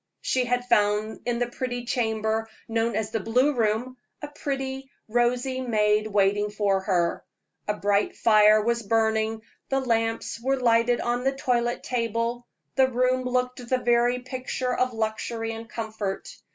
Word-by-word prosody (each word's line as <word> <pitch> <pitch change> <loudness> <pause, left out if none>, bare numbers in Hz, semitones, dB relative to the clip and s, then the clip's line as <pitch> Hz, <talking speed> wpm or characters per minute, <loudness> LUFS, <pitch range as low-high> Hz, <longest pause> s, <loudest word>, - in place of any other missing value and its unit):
She 255 -1 +1
had 245 0 0
found 210 -2 +1
in 240 -1 0
the 245 - +1
pretty 245 0 -4
chamber, 220 -2 -1 0.2
known 230 0 0
as 220 0 -2
the 225 - -1
blue 250 +8 +2
room, 235 +2 0 0.3
a 295 - -4
pretty, 270 -2 -4 0.2
rosy 245 +3 +1
maid 215 -3 +2
waiting 205 0 +2
for 205 -2 +1
her; 180 -3 0 0.4
a 210 - 0
bright 205 0 +1
fire 215 -1 +5
was 235 +1 +1
burning, 220 0 +1 0.3
the 270 - +2
lamps 225 -2 -1
were 265 +2 0
lighted 235 0 +3
on 240 +1 -1
the 270 +1 +1
toilet 240 -2 0
table: 235 0 -2 0.3
the 265 -1 +4
room 255 0 +1
looked 250 0 -1
the 255 - +3
very 240 0 +2
picture 255 0 -3
of 255 0 +1
luxury 225 0 -3
and 225 0 -8
comfort. 220 -4 -5
235 Hz, 150 wpm, -26 LUFS, 220-250 Hz, 0.4 s, fire